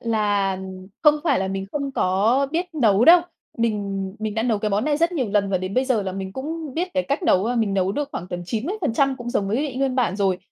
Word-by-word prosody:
là 205 -4 0 0.4
không 300 -2 +6
phải 285 -5 +3
là 190 0 -1
mình 195 0 -3
không 280 -2 -3
có 220 +9 +2
biết 345 +3 0
nấu 225 -6 +3
đâu, 345 +4 +8 0.4
mình 200 -4 -1
mình 215 -1 -3
đã 220 - 0
nấu 230 -3 +1
cái 210 +1 -2
món 205 +2 +1
này 300 -1 +1
rất 335 +3 +1
nhiều 260 -9 -1
lần 200 -1 +1
và 190 - +1
đến 185 +2 -5
bây 255 - +2
giờ 255 -5 +1
là 190 -1 -4
mình 190 0 -5
cũng 300 +3 -5
biết 355 +3 -1
cái 275 - +2
cách 280 +6 -2
nấu 190 - +3
và 240 +2 0
mình 220 -4 0
nấu 190 0 +1
được 290 +2 -2
khoảng 180 - -5
tầm 175 -1 -5
90% 275 - 0
cũng 240 -1 -6
giống 195 -4 0
với 220 - 0
vị 280 -2 -2
nguyên 265 -1 0
bản 235 -8 +1
rồi, 195 -3 +1
225 Hz, 255 wpm, -22 LUFS, 195-275 Hz, 0.4 s, đâu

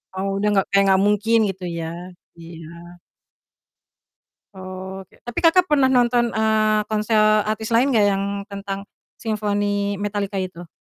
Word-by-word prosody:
Oh, 190 +1 -2
udah 200 +2 0
enggak 195 -2 +2
kayak 200 0 +4
enggak 190 -1 +4
mungkin 210 +2 +2
gitu 190 -1 -7 0.2
ya? 165 - -4 0.5
Iya. 165 -1 -11 1.9
Oke, 190 0 -9
tapi 240 -1 -4
Kakak 350 +2 +5
pernah 295 -6 +2
nonton, 245 -2 +3
eee, 215 -1 +2
konser 215 +1 0 0.3
artis 220 +1 -3
lain 235 +4 +4
gak 215 - +4
yang 195 0 -1 0.3
tentang 195 0 -5 0.3
Symphony 205 -2 -1
Metallica 205 0 -3
itu? 175 -2 -9
205 Hz, 135 wpm, -21 LUFS, 195-220 Hz, 1.9 s, Kakak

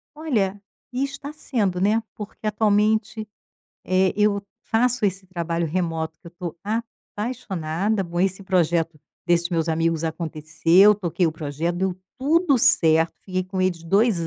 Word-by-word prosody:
Olha, 210 -11 -1 0.3
e 255 +2 -1
está 280 +1 -5
sendo, 205 -12 -1
né, 215 +3 +2
porque 215 +1 -9
atualmente, 215 +1 +1 0.6
eh, 185 0 +2
eu 210 -1 +2 0.2
faço 240 0 +1
esse 190 -1 -1
trabalho 170 -2 -2
remoto 160 -1 -2
que - - -19
eu - - -9
estou 175 -1 -7
apaixonada. 210 -4 -3
Bom, 175 -1 -5
esse 190 +1 0
projeto 170 -4 +1 0.3
desses 170 0 +2
meus 165 -1 0
amigos 165 0 0
aconteceu, 165 +4 +3
toquei 175 -3 0
o 160 - 0
projeto, 160 +3 -3
deu 190 0 0 0.2
tudo 300 +1 +3
certo, 160 -6 +4
fiquei 185 -1 -3
com 185 0 -4
eles 180 -3 0
2 195 -1 +2
185 Hz, 145 wpm, -23 LUFS, 165-215 Hz, 0.6 s, certo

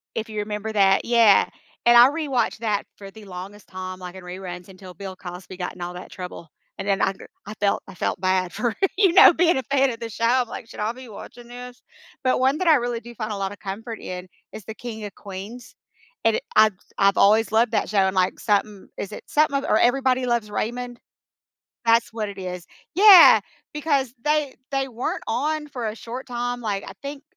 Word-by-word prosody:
If 225 0 -3
you 215 -1 -4
remember 210 +1 -4
that 195 -2 +3
yeah, 230 -4 +5 0.4
and 240 0 +7
I 245 +3 +9
rewatched 280 -8 -1
that 210 -3 -1
for 195 -1 -10
the 220 0 -13
longest 195 +2 -9
time, 185 0 -7
like, 180 0 -8
in 190 - -10
reruns 180 0 -8
until 185 -1 -12
Bill 190 +2 -8
Cosby 180 +1 -9
got 180 -1 -4
in 180 - -12
all 175 0 -4
that 180 +1 -10
trouble, 180 -3 -8 0.3
and 195 - -5
then 195 -1 +1
I 195 - +2
go 190 - -13 0.2
I 210 - -7
felt 205 -1 0
I 195 - -10
felt 175 - -2
bad 185 -1 +1
for, 240 -2 -1 0.2
you 385 -4 +4
know, 375 - +9
being 340 0 +3
a 265 - -2
fan 275 -1 +3
of 230 - -8
the 230 - -5
show. 230 +2 -2
I'm, 245 +1 +3
like, 225 - -8
"Should - - -11
I 210 +1 0
be 255 -1 -12
watching 235 +3 -11
this?" 245 0 -10 0.4
But 255 - +2
one 265 +3 +2
that 370 - -1
I 320 - +7
really 240 -3 -1
do 240 +1 -12
find 215 -1 -4
a - - -2
lotta 195 +1 -4
comfort 220 +3 -6
in 180 0 -7 0.3
is 215 - -8
the 220 - -6
King 220 -3 -7
of 200 - -9
Queens. 205 +5 -9 0.5
And 225 -1 +4
it - - -7
I've 215 -1 +6
s 185 - -30
I've 195 0 +3
always 215 +2 +4
loved 225 +1 +3
that 215 - 0
show 210 - +1
and, 190 0 +2
like, 185 0 +1
something 205 -1 -1
is 200 - -5
it 210 - -8
something 295 -2 +2
of 275 - -3
or 215 - +3
Everybody 255 0 +2
Loves 235 -3 0
Raymond? 245 +3 -4 0.9
That's 230 0 +4
what 215 -2 -3
it 200 - -10
is. 180 -2 -6 0.3
Yeah, 390 -2 +9 0.3
because 280 -5 0
they 300 -2 0 0.2
they 270 -1 0
weren't 245 -1 -4
on 300 +5 -1
for 250 -5 -5
a 215 - -4
short 240 +3 -8
time, 245 0 -3
like, 205 -3 -2
I - - -8
think 280 0 -7
220 Hz, 225 wpm, -23 LUFS, 195-250 Hz, 0.9 s, I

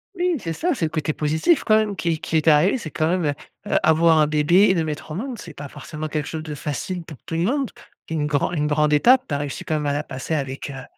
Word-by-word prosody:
Oui 355 -1 +1
c'est 165 -6 -4
ça, 345 - 0
c'est 170 - -1
le - - -1
côté 155 -1 -1
positif 160 - +1
quand 215 - +4
même 215 -2 +1
qui 165 -4 -1
qui 160 - -1
est 155 - -1
arrivé 160 - +5
c'est 160 -10 -7
quand 155 +1 0
même, 180 -2 0
heu 145 - +1 0.4
heu, - - +4
avoir 160 0 +4
un 150 - +4
bébé 155 +6 +4
et 190 - +4
le 165 - +1
mettre 155 0 -5
au 155 - -5
monde, 240 +4 -5
c'est 165 -3 -10
pas 145 - -7
forcément 150 +2 -7
quelque 150 -1 -3
chose 160 -1 -5
de 155 -1 -6
facile 150 +5 -4
pour 155 -3 -11
tout - - -7
le 165 - 0
monde. 270 +6 0 0.4
C'est - - -5
une 150 -2 0
gran 145 0 0
une 150 -4 0
grande 150 0 +2
étape. 250 - +5
Tu - - -4
as 140 - 0
réussi 145 -2 -4
quand 155 - -2
même 150 -1 -1
à 140 - +1
la 145 +1 -1
passer 140 +3 -4
avec, 135 0 -4
heu, 135 -2 -7
155 Hz, 290 wpm, -22 LUFS, 150-180 Hz, 0.4 s, arrivé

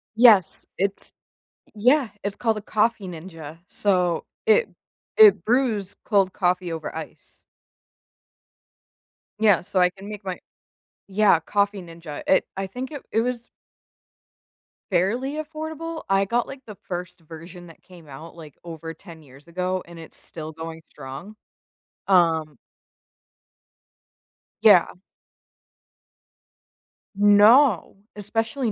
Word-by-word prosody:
Yes, 220 -7 +5
it's 195 +2 -2 0.6
Y 210 - -11
yeah, 280 -7 -1 0.2
it's 200 0 -2
called 225 -2 0
a - - -5
Coffee 215 -1 0
Ninja. 165 -2 -9
So 180 -4 0 0.2
it 450 +2 +4 0.5
it 435 -2 +7
brews 225 -5 0
cold 195 -3 +2
coffee 180 -2 0
over 160 -1 -6
ice. - - -10 2.0
Yeah, 210 -5 +4
so 185 +2 -1
I 180 0 +5
can 195 +3 -12
make 210 -1 -8
my 190 -1 -3 0.5
Y 195 - -21
yeah, 205 -6 +5
Coffee 200 +4 0
Ninja, 165 -3 -9
it 190 - +4
I 195 0 -2
think 250 +7 -6
it 290 -3 -7
it 225 - +2
was 240 -1 -3 1.4
Fairly 225 +10 0
affordable. 315 +1 -6
I 195 0 +3
got, 235 +4 0
like, 270 -1 -9
the 210 -3 -10
first 180 0 -5
version 170 +2 -12
that 165 - -16
came 175 -4 -16
out, 155 +5 -11
like, 155 -4 -12
over 165 -1 -7
10 165 -4 -14
years 135 0 -17
ago, 185 +2 -2
and 170 -1 -12
it's 160 - -12
still 155 -1 -7
going 160 0 -8
strong. 145 +9 -10 0.7
Um 160 -6 +2 2.1
Yeah. 205 -6 +6 2.2
No. 205 - +5 0.2
Especially 225 +4 -2
190 Hz, 120 wpm, -23 LUFS, 170-225 Hz, 2.2 s, it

